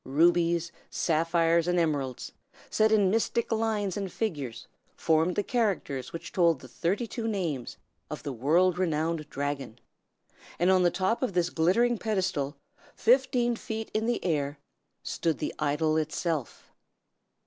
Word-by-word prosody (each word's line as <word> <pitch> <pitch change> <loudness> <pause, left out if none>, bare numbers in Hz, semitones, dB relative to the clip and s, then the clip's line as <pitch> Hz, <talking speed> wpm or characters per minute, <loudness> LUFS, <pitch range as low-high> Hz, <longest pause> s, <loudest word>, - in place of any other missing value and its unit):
Rubies, 170 +3 +2 0.2
sapphires, 165 +1 +2
and 180 0 +2
emeralds, 145 -7 -1 0.4
set 215 0 +3
in 205 -4 +4
mystic 230 +2 0
lines 220 -4 0
and 195 -3 -3
figures, 140 - -3 0.3
formed 160 +2 +2
the 205 - +1
characters 190 - -1
which 165 - -7
told 170 -5 +3
the 130 - -12
thirty 180 - -1
two 230 0 -4
names 170 - -3 0.3
of - - -6
the 140 - -4
world 170 +9 +2
renowned 160 -2 -1
dragon; 140 -4 -4 0.8
and 175 +3 +3
on 185 -1 +4
the 175 - +4
top 190 +6 0
of 255 -7 -1
this 175 0 +1
glittering 220 +8 +2
pedestal, 185 -10 -1 0.4
fifteen 245 -1 +3
feet 220 0 -5
in 220 +1 0
the 240 - -1
air, 145 -4 0 0.5
stood 165 -3 -1
the - - -3
idol 155 +1 +1
itself. 155 -2 -3
170 Hz, 140 wpm, -28 LUFS, 155-210 Hz, 0.8 s, in